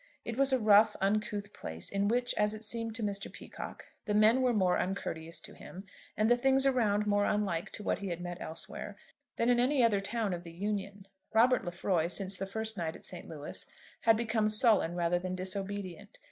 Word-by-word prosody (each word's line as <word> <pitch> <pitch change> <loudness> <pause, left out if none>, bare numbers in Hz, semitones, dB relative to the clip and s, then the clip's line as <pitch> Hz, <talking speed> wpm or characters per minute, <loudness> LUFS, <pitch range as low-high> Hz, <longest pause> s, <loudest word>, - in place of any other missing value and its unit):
It 230 - -3
was 275 +1 +3
a 260 - +4
rough, 215 -1 +5
uncouth 205 +1 -1
place, 80 +1 -5
in 200 0 +1
which, 245 +3 +2
as 210 0 +1
it 215 - -9
seemed 230 0 -3
to 225 - -4
Mr. 200 -1 -2
Peacocke, - - -9 0.2
the 210 -2 0
men 220 +4 +5
were 255 -1 +3
more 190 -5 +2
uncourteous 165 -3 -3
to - - -9
him, 190 - -10 0.3
and 215 - +3
the 240 - +5
things 270 +2 +3
around 215 -6 +2
more 205 0 +2
unlike 195 -5 0
to 210 - -6
what - - 0
he 200 - -5
had 170 -2 -3
met 175 0 -6
elsewhere, 160 +1 -4 0.4
than 230 - +1
in 245 -1 +4
any 255 +1 +3
other 210 -4 +3
town 210 0 -1
of 175 - -4
the 170 -1 -10
Union. 200 +1 -4 0.3
Robert 250 +3 +5
Lefroy, 175 -1 0
since 190 +2 -1
the 195 +1 -4
first 220 +2 -3
night 160 -2 -2
at - - -13
St. 180 - -7
Louis, 150 -2 -6 0.4
had 225 -1 +4
become 220 -2 +1
sullen 215 -6 +3
rather 175 0 +1
than 185 0 -4
disobedient. 195 +1 -4
205 Hz, 205 wpm, -31 LUFS, 185-225 Hz, 0.4 s, rough